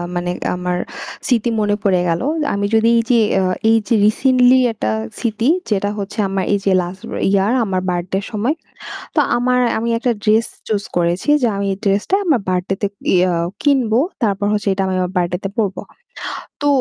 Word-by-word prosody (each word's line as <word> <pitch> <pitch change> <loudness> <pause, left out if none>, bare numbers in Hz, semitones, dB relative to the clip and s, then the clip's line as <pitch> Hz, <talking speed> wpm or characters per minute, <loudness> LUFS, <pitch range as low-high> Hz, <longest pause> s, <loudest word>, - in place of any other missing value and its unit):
মানে 175 0 -1 0.2
আমার 180 0 -2 0.5
স্মৃতি 240 -2 +2
মনে 205 -1 +1
পড়ে 185 -3 +3
গেল। 165 0 0 0.3
আমি 200 0 -1
যদি 225 +1 +4
এই - - +4
যে 240 - +5 0.2
অ্যা 190 -1 +2 0.2
এই 225 - +5
যে 230 - +2
রিসেন্টলি 255 +3 +4
একটা 110 - -2 0.3
স্মৃতি 230 0 -1 0.2
যেটা 205 -1 0
হচ্ছে 200 +1 -6
আমার 195 0 -1
এই - - +3
যে 195 - +3
লাস্ট 180 +2 -7 0.3
ইয়ার 200 +2 +2
আমার 190 -3 -1
বার্থডে 180 +1 -2
এর - - -9
সময়। 225 +8 0 0.6
তো - - +3 0.2
আমার 250 +1 +2 0.2
আমি 230 +1 -2
একটা 245 +1 0
ড্রেস 220 +2 +3 0.2
চুজ 205 -2 -1
করেছি 175 +8 0
যে 245 - +3
আমি 200 0 -2
এই - - -7
ড্রেস 200 0 +2
টা 385 - +4
আমার 290 - +2
বার্থডে 185 +1 -1
তে 205 - +2 0.3
ইয়া 180 0 +3 0.3
কিনব। 270 -6 +2 0.3
তারপর 205 -2 0
হচ্ছে 210 -1 -2
ওইটা 195 0 0
আমি 190 - -1
আমার 180 0 -1
বার্থডেতে 180 +2 -1
পড়বো। 205 -4 -1 0.8
তো 290 - +1
205 Hz, 185 wpm, -18 LUFS, 185-230 Hz, 0.8 s, যে